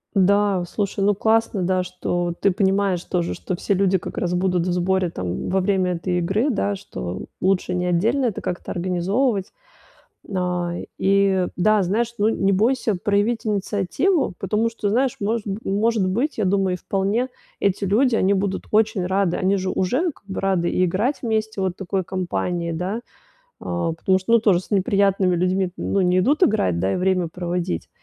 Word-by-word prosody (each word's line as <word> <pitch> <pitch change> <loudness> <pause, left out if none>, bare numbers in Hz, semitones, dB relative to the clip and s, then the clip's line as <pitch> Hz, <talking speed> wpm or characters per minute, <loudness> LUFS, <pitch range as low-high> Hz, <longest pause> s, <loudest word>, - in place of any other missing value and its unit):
Да, 200 -1 +3
слушай, 200 +2 -2
ну, 205 +1 +4
классно, 220 0 +1
да, 185 +1 +1
что 175 -1 -2
ты 200 - +4
понимаешь 190 -1 +1
тоже, 175 -2 -2
что 180 - -4
все 195 +3 -1
люди 190 0 +2
как - - -8
раз 180 -1 -1
будут 180 -1 +1
в 180 - 0
сборе, 180 0 +1
там, 90 - -4
во 190 - +2
время 185 -1 +1
этой 180 +1 -2
игры, 195 +10 +1
да, 205 -4 0
что 90 - -6 0.2
лучше 185 -1 +1
не 180 0 -1
отдельно 220 +10 +1
это 225 -5 -2
как-то 180 - -4
организовывать. 190 +5 0 0.7
На 180 -2 -2 0.2
и 195 -1 +3
да, 210 +3 +3
знаешь, 220 +6 0
ну, 210 +1 +3
не 195 -3 +1
бойся 225 +2 +2
проявить 205 +5 0
инициативу, 210 - 0
потому 220 +2 0
что, 225 -2 -3
знаешь, 250 +4 +1
может 220 +2 -1
б 200 0 -3
может 210 0 +1
быть, 245 +11 -1
я 215 - +1
думаю, 190 -1 +1
и - - -5
вполне, 200 +8 -1 0.3
эти 200 0 0
люди, 230 +6 +3
они 195 -2 +2
будут 195 0 -1
очень 215 -3 +2
рады. 190 -1 +1
Они 190 +2 +2
же 185 -1 -2
уже 255 - 0
как 240 - -25
бы 195 - -4
рады 185 -3 +1
и 185 - +2
играть 210 - 0
вместе 220 -3 -1
вот 190 -1 0
в - - -48
такой 190 -1 -2
компании, 175 -2 -2
да, 185 +7 -3 0.6
а, 170 -1 -2
потому 185 +3 +1
что, 190 +5 -1
ну, 235 - +7
тоже 200 -5 +3
с 180 - -13
неприятными 195 -2 +2
людьми, 185 +1 0
ну, 195 - 0
не 180 0 +3
идут 290 - +3
играть, 95 - +2
да, 95 +3 0
и - - 0
время 185 -1 +1
проводить. 175 - -3
190 Hz, 185 wpm, -22 LUFS, 180-210 Hz, 0.7 s, ну